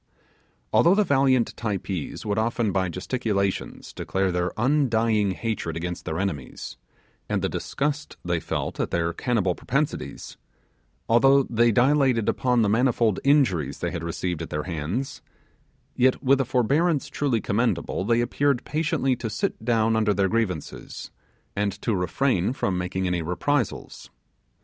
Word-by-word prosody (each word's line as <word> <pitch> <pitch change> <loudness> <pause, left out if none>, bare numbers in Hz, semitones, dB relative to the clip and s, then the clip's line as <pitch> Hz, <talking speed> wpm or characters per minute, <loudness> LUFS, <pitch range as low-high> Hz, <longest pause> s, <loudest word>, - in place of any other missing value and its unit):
Although 175 +3 +5
the 210 - +4
valiant 135 - +2
Typees 100 -6 -4
would 105 0 0
often 115 -1 0
by 95 -1 0
gesticulations 100 0 -2
declare 95 -1 -1
their 90 0 -1
undying 115 -5 +2
hatred 95 -5 -3
against 90 +1 -5
their 80 -2 -3
enemies, 85 -9 -4 0.5
and - - 0
the - - +2
disgust 145 +1 -3
they 85 -1 0
felt 80 - -4
at - - 0
their 85 0 0
cannibal 105 -7 0
propensities; 125 - -3 0.7
although 135 +4 +5
they 120 -1 +2
dilated 130 -2 +3
upon 125 -2 +2
the - - +2
manifold 115 -1 +2
injuries 130 - +2
they - - -3
had 85 - -5
received 85 0 -3
at - - -5
their 75 0 -3
hands, 90 - -4 0.7
yet 130 +3 +2
with 135 +1 +4
a - - -1
forbearance 140 +6 +1
truly 135 -6 0
commendable, 105 -3 -1
they 115 +3 +2
appeared 130 +1 +1
to 135 -6 0
sit 110 - -3
down 115 -1 +2
under 110 -2 +2
their 100 0 +2
grievances, 100 -8 -3 0.4
and 100 -1 0
to 115 - -1
refrain 95 +3 +1
from 100 -8 -1
making 90 +1 -2
any 90 -1 0
reprisals. 105 - -2
110 Hz, 140 wpm, -25 LUFS, 95-130 Hz, 0.7 s, Although